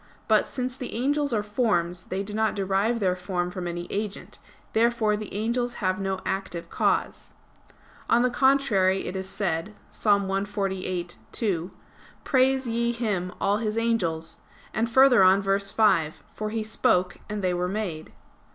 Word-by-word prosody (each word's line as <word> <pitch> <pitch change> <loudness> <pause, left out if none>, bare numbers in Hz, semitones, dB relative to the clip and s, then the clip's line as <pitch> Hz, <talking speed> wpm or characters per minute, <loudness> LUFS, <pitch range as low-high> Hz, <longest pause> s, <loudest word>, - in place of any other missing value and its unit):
But - - +4
since 250 -1 -3
the 255 - -6
angels 285 +4 +1
are 215 -3 +1
forms, 185 -6 0
they 190 +1 -3
do 205 +1 -7
not 220 0 +1
derive 200 +4 +1
their 185 -3 +1
form 180 -1 -2
from 180 -1 -4
any 175 0 -4
agent. 205 0 -4 0.3
Therefore 225 -2 +2
the 210 -1 -6
angels 235 +4 -1
have 185 -2 -1
no 195 -1 -1
active 185 -3 -3
cause. - - -1 0.8
On 240 +1 +4
the 250 - +2
contrary, 240 -9 +3
It 180 - -5
is 190 0 -4
said 190 +1 -2 0.2
(Ps. - - -11
148:2): 195 -2 -1 0.5
"Praise 265 -1 +2
ye 235 +1 0
Him, 205 -7 -2
all 200 +1 +2
His 215 0 -2
angels"; 170 -9 -1 0.3
and 225 +2 0
further 260 -1 +6
on, 190 +1 +6
verse 200 0 +1
5: 190 -9 +2
"For 215 0 -4
He 220 0 -2
spoke 180 -4 +1
and 210 -1 -4
they 180 -1 +1
were 180 0 -1
made." 180 -6 -4
205 Hz, 155 wpm, -26 LUFS, 185-230 Hz, 0.8 s, further